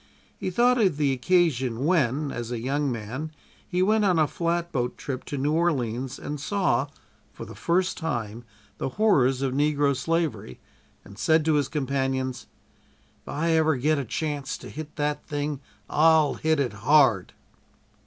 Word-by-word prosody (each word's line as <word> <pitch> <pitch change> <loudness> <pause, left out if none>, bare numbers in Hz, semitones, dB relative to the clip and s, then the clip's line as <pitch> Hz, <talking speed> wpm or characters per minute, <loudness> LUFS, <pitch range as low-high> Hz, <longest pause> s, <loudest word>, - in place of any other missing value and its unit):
He - - -4
thought 245 +6 +3
of 185 -8 +2
the 145 -3 +2
occasion 130 -5 +1
when, 150 -4 +1
as 120 0 -5
a 120 - -2
young 140 +3 -1
man 120 +7 -5 0.4
he 180 0 +1
went 215 +2 +3
on 185 -4 +3
a 155 - +4
flatboat 170 -7 -2
trip 130 -2 -5
to 145 - -5
New 140 +3 0
Orleans 130 -6 -1
and 145 0 -6
saw, 145 -7 0 0.4
for - - -9
the - - -10
first, 180 +2 0
the 115 -8 -3 0.5
horrors 135 - +3
of 130 -2 -1
negro 145 0 +2
slavery, 135 - -2 0.5
and 100 +1 -13
said 160 +6 +3
to 160 - +3
his 145 -3 +2
companions: 135 -3 -2 0.8
"If - - -5
ever 160 0 +2
I - - -5
get 150 +3 +2
a - - -2
chance 145 +2 -3
to - - -11
hit 155 0 -8
that 150 0 -2
thing 145 -1 -3 0.3
I'll 155 -2 +4
hit 160 -1 0
it 125 -6 0
hard!" 115 -2 +3
145 Hz, 160 wpm, -25 LUFS, 130-160 Hz, 0.8 s, a